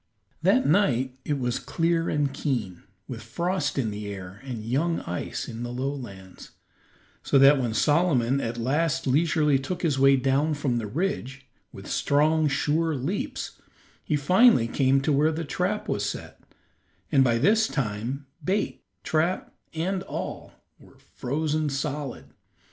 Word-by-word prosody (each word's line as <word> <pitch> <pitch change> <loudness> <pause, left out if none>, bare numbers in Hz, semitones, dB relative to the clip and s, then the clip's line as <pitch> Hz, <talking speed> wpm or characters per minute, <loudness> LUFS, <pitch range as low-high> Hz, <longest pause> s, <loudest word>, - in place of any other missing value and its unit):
That 205 +10 +3
night 130 - +2
it 145 - -1
was 125 -2 -1
clear 165 0 0
and 145 -2 0
keen, 120 - -3 0.3
with 120 -3 -6
frost 150 - -2
in 115 -6 0
the 105 0 -6
air 95 -1 -8
and 120 -5 -6
young 155 +8 0
ice 90 - -4
in 115 - -7
the 120 0 -4
lowlands, 125 -8 -6 0.7
so - - +2
that 135 +1 +7
when 115 -3 -2
Solomon 140 -2 +2
at 115 +1 -3
last 145 +7 0
leisurely 150 0 +3
took 180 +8 -5
his 145 -5 +1
way 135 0 +6
down 135 +4 +1
from 135 -5 -1
the 110 - -4
ridge, 135 - -3 0.3
with - - -11
strong, 155 +2 +2
sure 155 +3 +1
leaps, 145 +10 -4 0.4
he 150 - 0
finally 180 - +5
came 135 +2 +2
to 150 +2 +1
where 150 +3 +3
the 160 +1 -4
trap - - -2
was - - -1
set, - - -5 0.7
and 135 -2 +5
by 120 -2 +2
this 215 - +3
time 125 +2 -3 0.2
bait, 195 +6 -1 0.2
trap, 160 +4 0 0.2
and 185 +4 -2
all 190 - -6 0.3
were - - -19
frozen 155 +3 -2
solid. 140 -1 -4
140 Hz, 150 wpm, -26 LUFS, 125-160 Hz, 0.7 s, that